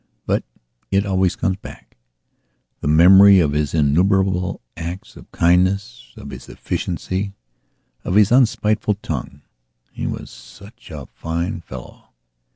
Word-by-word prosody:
But - - 0 0.5
it 100 +1 +1
always 95 -2 +1
comes 95 0 -1
backthe 60 -10 -13 0.9
memory 95 +6 +7
of 75 -5 +2
his 75 +1 -1
innumerable 90 +5 +1 0.2
acts 85 +3 -7
of - - -15
kindness, 95 +7 +1
of - - -9
his - - -10
efficiency, 100 +2 -4 0.7
of 90 - -2
his 105 0 +5
unspiteful 110 -4 +2
tongue. 70 -1 -5 0.5
He - - -5
was - - -6
such 100 - -15
a 75 -5 -8
fine 85 - -4
fellow. 65 -6 -12
95 Hz, 120 wpm, -20 LUFS, 80-100 Hz, 0.9 s, memory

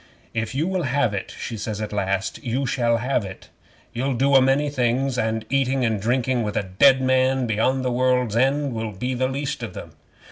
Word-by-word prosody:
'"If 115 +2 -3
you 150 +4 +1
will 190 -1 -1
have 130 -5 0
it," 100 - -5
she 115 - -5
says 105 0 -4
at 105 -1 -4
last, 95 -1 -2
"you 125 +3 -1
shall 120 -3 +1
have 125 0 0
it. 95 -1 -10 0.4
You'll 130 +2 -1
do 135 +3 +2
a 135 - +8
many 135 +3 +2
things, 130 -1 0
and 110 -2 -1
eating 135 -1 +1
and 110 -3 0
drinking 125 +2 +1
with 105 -2 -2
a 105 - +1
dead 130 +8 +4
man 130 0 +2
beyond 125 +4 0
the 125 - +1
world's 125 -2 +1
end 135 +2 +1
will 110 -1 -4
be 125 +7 -3
the 130 +1 0
least 140 +2 -3
of - - -6
them. - - -8
125 Hz, 210 wpm, -23 LUFS, 110-135 Hz, 0.4 s, a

